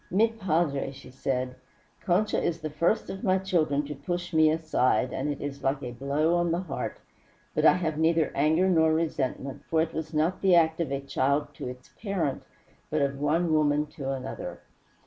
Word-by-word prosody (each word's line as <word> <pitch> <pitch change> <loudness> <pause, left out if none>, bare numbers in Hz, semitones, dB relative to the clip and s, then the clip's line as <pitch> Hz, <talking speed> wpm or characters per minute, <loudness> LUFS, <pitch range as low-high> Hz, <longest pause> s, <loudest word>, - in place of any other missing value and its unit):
"Mi 215 +5 +3
padre," 170 -11 0
she 130 -1 -13
said, 130 -1 -2 0.5
"Concha 200 +3 +1
is 170 -1 -1
the 155 -1 -4
first 170 +9 +1
of 190 - -7
my 190 -1 +3
children 155 -7 +1
to 150 - -5
push 175 +5 -4
me 160 -1 +5
aside, 155 -7 +1
and 140 +3 -2
it 145 - -3
is 140 -1 -5
like 135 +1 0
a 125 - -4
blow 140 +6 0
on 175 0 +1
the 170 +2 0
heart; 180 -6 -4 0.6
but - - +1
I - - +8
have 160 -4 -2
neither 165 0 +2
anger 160 +6 +3
nor 160 -3 +4
resentment, 140 -4 -2
for 160 - +2
it 160 0 0
was 160 0 -4
not 160 +3 0
the 190 -2 +5
act 160 -1 +3
of 160 - -2
a 140 0 -1
child 140 +1 0
to - - -6
its 125 0 -9
parent, 185 - -1 0.5
but 155 -1 +1
of 140 0 -1
one 160 +3 +1
woman 150 -1 +3
to 135 -3 -5
another. 135 -1 -5
155 Hz, 195 wpm, -27 LUFS, 140-170 Hz, 0.6 s, I